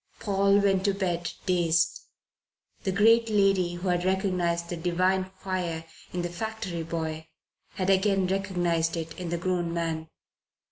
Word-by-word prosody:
Paul 200 -1 +3
went 195 -2 +2
to 200 -1 +2
bed 175 -3 -1
dazed. 170 -2 +2 0.8
The 190 - +1
great 225 +4 +5
lady 195 -4 +2
who 180 +2 -3
had 175 0 +1
recognized 180 -3 0
the 175 - -2
divine 185 +2 +1
fire 180 -4 -3 0.3
in 175 -1 -2
the 175 - -2
factory 190 -1 -4
boy 160 -1 -4 0.5
had 190 0 +1
again 195 0 +3
recognized 175 -4 0
it 160 -1 -4
in 180 -2 -4
the 170 - -1
grown 175 -1 -1
man. 160 -1 -2
180 Hz, 145 wpm, -27 LUFS, 170-195 Hz, 0.8 s, great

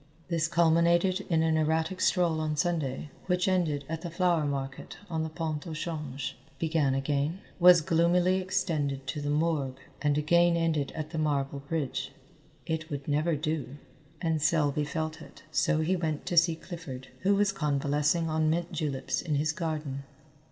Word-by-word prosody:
This 165 -2 +1
culminated 170 +3 +3
in 160 -2 +3
an 160 -1 +2
erratic 160 +4 0
stroll 170 -4 +2
on 155 -1 -1
Sunday 150 -4 -1 0.2
which 180 0 +1
ended 165 -7 +1
at 160 0 -4
the 175 - -5
flower 170 -2 +2
market 135 -1 -4
on 160 -1 0
the 160 - -2
Pont 155 -1 -4
au 160 - -5
Change, 150 -5 -4 0.2
began 155 -5 +1
again, 145 +5 -1 0.2
was 175 -1 +8
gloomily 175 +4 +3
extended 150 -8 -1
to 145 +2 -3
the 145 - -2
morgue, 150 -3 0 0.2
and 145 -1 +2
again 170 +3 +4
ended 160 -4 0
at 155 -1 -5
the 160 - -3
marble 140 -2 0
bridge. 140 -1 -3 0.5
It 160 0 -3
would 140 -2 -5
never 155 +3 +1
do, 150 -2 -3 0.5
and 160 -2 +1
Selby 150 -2 +2
felt 155 +1 -3
it, 145 - -14
so 160 0 +2
he 175 +4 +1
went 160 -4 -2
to 175 - -2
see 170 0 +5
Clifford, 160 -7 -8
who 200 +2 +3
was 200 0 +3
convalescing 150 0 +1
on 155 0 +1
mint 170 +2 -1
juleps 135 -5 -2
in 155 -4 -1
his 155 +2 +1
garden. 155 -5 -3
160 Hz, 165 wpm, -29 LUFS, 145-170 Hz, 0.5 s, was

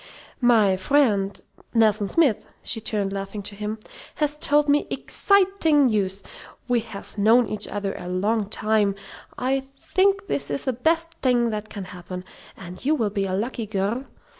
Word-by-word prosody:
"My 220 -6 +4
friend 200 -4 +2 0.4
Nelson 215 -2 +4
Smith" 280 -4 +2 0.2
(she 225 - +1
turned, 205 -3 -2
laughing, 195 +1 -5
to 205 +1 -7
him), 210 +1 -4 0.4
"has 300 -1 0
told 295 0 +3
me 290 +1 +3
ex - - -6
citing 380 -7 +4
news. 200 -4 0 0.4
We 245 -1 +3
have 215 -2 -9
known 225 +3 +5
each 210 0 -4
other 200 -1 -3
a - - -7
long 200 +3 0
time. 215 -2 +1 0.4
I 265 +1 -1
think 395 +5 +1
this 285 - -2
is 275 - -2
the 260 - +1
best 325 +6 +1
thing 240 -3 +2
that 215 0 -4
can 200 - -6
happen. 180 0 -8 0.3
And 180 0 -10
you 300 +4 +3
will 220 -7 0
be 200 -1 -1
a 185 - -1
lucky 225 +2 -3
girl. 210 +6 -1
220 Hz, 165 wpm, -24 LUFS, 200-270 Hz, 0.4 s, known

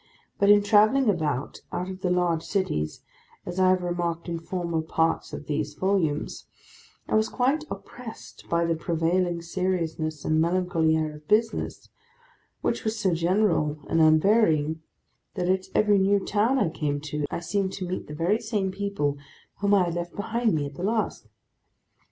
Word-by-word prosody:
But 200 - +4
in 205 0 +7
travelling 215 +4 +5
about, 150 -7 -2
out 180 +1 -3
of 190 0 -7
the 185 - 0
large 175 -2 +1
cities—as 175 - -4
I 185 0 +5
have 185 -1 +2
remarked 175 -1 -2
in 170 -1 -3
former 170 -1 -2
parts 160 +1 0
of - - -7
these 150 0 -2
volumes—I 175 -5 -3
was 215 0 +3
quite 275 +5 +1
oppressed 235 -3 -9
by 170 0 +2
the 165 - +1
prevailing 170 +1 0
seriousness 165 -4 -2
and 155 0 +2
melancholy 170 -2 +2
air 155 -1 -2
of 150 0 -19
business: 220 +1 0 0.7
which - - -1
was 220 0 -1
so 190 -4 +2
general 170 -3 +1
and 165 - +2
unvarying, 160 -2 +4 0.5
that 180 -2 -1
at 190 0 +1
every 210 -1 +4
new 200 +1 +3
town 220 +6 +2
I 205 -10 +2
came 150 -3 -2
to, 150 -1 -3
I - - -3
seemed 190 +2 -1
to 185 -2 -4
meet 185 - -4
the 150 - -7
very 175 +8 +1
same 210 -4 -1
people 190 -8 -2 0.4
whom 205 0 +3
I 190 - +4
had 170 -1 -2
left 175 0 -4
behind 225 0 0
me, 145 -2 0
at 140 - -7
the 155 - -7
last. 220 +2 -1
175 Hz, 165 wpm, -26 LUFS, 160-200 Hz, 0.7 s, in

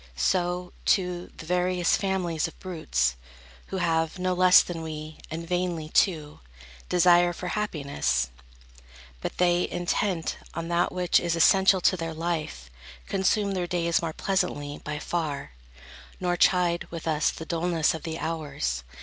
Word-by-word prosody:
So, 180 - 0
too, 180 -2 0
the - - -9
various 180 0 +2
families 180 -5 -1
of 165 - -13
brutes, 65 - -1 0.5
Who 190 - -4
have, 165 -1 0
no 185 0 0
less 180 0 +7
than 170 -2 -6
we, 155 -1 -7
and 165 +1 -5
vainly, 175 -3 -1
too, 155 -5 +1 0.5
Desire 175 0 +5
for 180 +1 -5
happiness; 140 - -1 0.9
but - - -5
they, 175 0 +2
intent 175 0 -1 0.2
On 165 +1 -4
that 170 0 +1
which 180 -1 +2
is 170 -1 -1
essential 190 +2 +5
to 185 - +4
their 165 -2 -4
life, 155 - -3 0.4
Consume 200 +1 +1
their 180 -2 -2
days 170 -1 +1
more 165 -1 -2
pleasantly, 155 -6 -2
by 150 0 -4
far, 150 - -3 0.7
Nor 180 -1 0
chide, 175 -1 +2
with 165 -1 -7
us, 155 -1 +2
the 160 - -7
dulness 165 -1 +1
of 160 - -6
the 160 -1 -4
hours. 145 - -3
170 Hz, 145 wpm, -26 LUFS, 160-180 Hz, 0.9 s, less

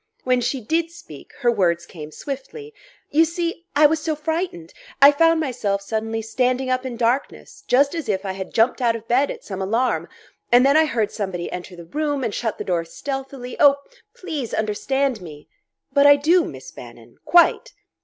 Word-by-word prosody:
When 250 -1 +2
she 245 +2 -2
did 325 +9 0
speak, 345 +1 -13
her 240 -2 +3
words 170 -6 +1
came 155 -4 -10
swiftly: 285 - -8 0.4
"You 315 +2 +5
see...I 335 -2 0
was 315 +2 +4
so 310 0 -1
frightened! 315 - -4 0.3
I 280 +1 +9
found 330 +2 +3
myself 235 -9 -1
suddenly 225 +2 -3
standing 255 +3 0
up 255 +1 -1
in 240 -2 -6
darkness, 250 - -2
just 280 +4 +3
as 325 -9 -4
if 195 -1 -1
I 190 - -2
had 190 0 -7
jumped 230 +3 +2
out 235 -2 +2
of 225 0 -9
bed 260 +5 +2
at - - -7
some 195 -2 -6
alarm; 225 +7 0 0.4
and 245 +2 +6
then 280 +1 +4
I 315 0 +5
heard 225 -8 -1
somebody 190 -5 -4
enter 180 0 -7
the 170 -1 -11
room 290 - -2
and 225 -4 -2
shut 225 -3 -3
the - - -4
door 175 -2 -1
stealthily...Oh, 270 - 0 0.4
please 305 - -5
understand 240 +3 -1
me!" 150 -4 -11 0.5
"But 280 0 +5
I 285 - +9
do, 330 +5 +3
Miss - - -9
Bannon - - -13
quite." 440 +8 +3
255 Hz, 185 wpm, -22 LUFS, 215-300 Hz, 0.5 s, I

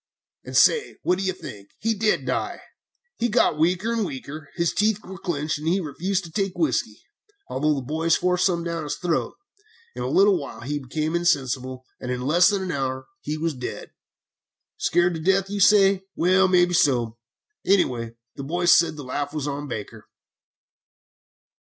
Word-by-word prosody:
"And - - -2
say, 465 - +4
what 180 +1 +1
do - - -2
you 190 - +1
think? 100 - -10
He 225 +1 0
did 215 0 0
die! - - -2 0.6
He 240 - +1
got 210 -9 +2
weaker 180 +8 +1
and 230 -2 0
weaker. 145 -2 -7
His 170 -2 0
teeth 210 0 +2
were 190 0 -9
clenched, 155 -3 -2
and 155 - -5
he 180 +4 +2
refused 185 +4 -2
to 165 - -10
take 195 +1 -2
whiskey, 315 - -1 0.5
although 150 +2 +1
the 135 - -4
boys 160 +4 +1
forced 180 0 +2
some 170 -2 -1
down 170 -1 -3
his 145 - -4
throat. 175 -3 -1 0.6
In - - -5
a - - -2
little 390 0 +4
while - - -8
he 145 +4 -3
became 155 +4 -3
insensible, 130 -6 0
and 125 - -6
in 125 0 -3
less 175 +7 +5
than 200 -2 -1
an 185 - -3
hour 130 -2 -3
he 155 - -4
was 165 0 -1
dead. 125 -2 -7 0.9
"'Scared 175 +1 +2
to 165 - -4
death,' 190 +3 +1
you 205 - -2
say? 195 -1 +5
Well, 185 +2 +4
maybe 175 -1 +3
so; 120 -9 +2 0.4
anyway, 120 -12 +1 0.2
the 140 - -6
boys 175 +5 +3
said 165 -2 +3
the 145 - -8
laugh 145 +3 -3
was 150 -1 -2
on 145 0 -4
Baker!" 110 -2 -7
170 Hz, 180 wpm, -24 LUFS, 140-190 Hz, 0.9 s, less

